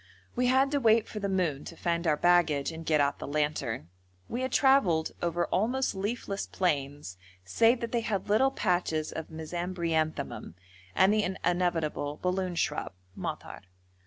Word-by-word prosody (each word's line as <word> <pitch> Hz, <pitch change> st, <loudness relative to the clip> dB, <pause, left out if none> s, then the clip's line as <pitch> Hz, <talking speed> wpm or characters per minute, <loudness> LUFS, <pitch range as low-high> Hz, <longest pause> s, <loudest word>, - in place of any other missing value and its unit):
We 250 Hz, +1 st, +2 dB
had 265 Hz, +2 st, +3 dB
to 285 Hz, -, +1 dB
wait 225 Hz, -2 st, +4 dB
for 210 Hz, -, -6 dB
the 200 Hz, -1 st, -2 dB
moon, 170 Hz, -7 st, 0 dB
to 165 Hz, -, -9 dB
find 170 Hz, 0 st, -1 dB
our 150 Hz, -1 st, +3 dB
baggage 170 Hz, -5 st, +3 dB
and 165 Hz, 0 st, -8 dB
get 155 Hz, -1 st, +3 dB
out 140 Hz, 0 st, +1 dB
the -, -, -6 dB
lantern. 145 Hz, -, -2 dB, 0.4 s
We 240 Hz, -, -3 dB
had 260 Hz, -1 st, -2 dB
travelled 225 Hz, -, +3 dB
over 175 Hz, 0 st, 0 dB
almost 250 Hz, +7 st, 0 dB
leafless 200 Hz, 0 st, -3 dB
plains 145 Hz, -, -2 dB, 0.3 s
save 230 Hz, -, +3 dB
that 235 Hz, -, -3 dB
they 235 Hz, -, +1 dB
had 210 Hz, -4 st, -2 dB
little 220 Hz, +6 st, +4 dB
patches 175 Hz, -9 st, -1 dB
of 160 Hz, -, -6 dB
mesembryanthemum, 165 Hz, -, -3 dB, 0.4 s
and 190 Hz, +2 st, +5 dB
the 215 Hz, -, +3 dB, 0.2 s
inevitable 165 Hz, -4 st, 0 dB
balloon 180 Hz, -1 st, -1 dB
shrub 150 Hz, -, -1 dB, 0.2 s
(madhar). -, -, -6 dB
175 Hz, 160 wpm, -29 LUFS, 155-215 Hz, 0.4 s, and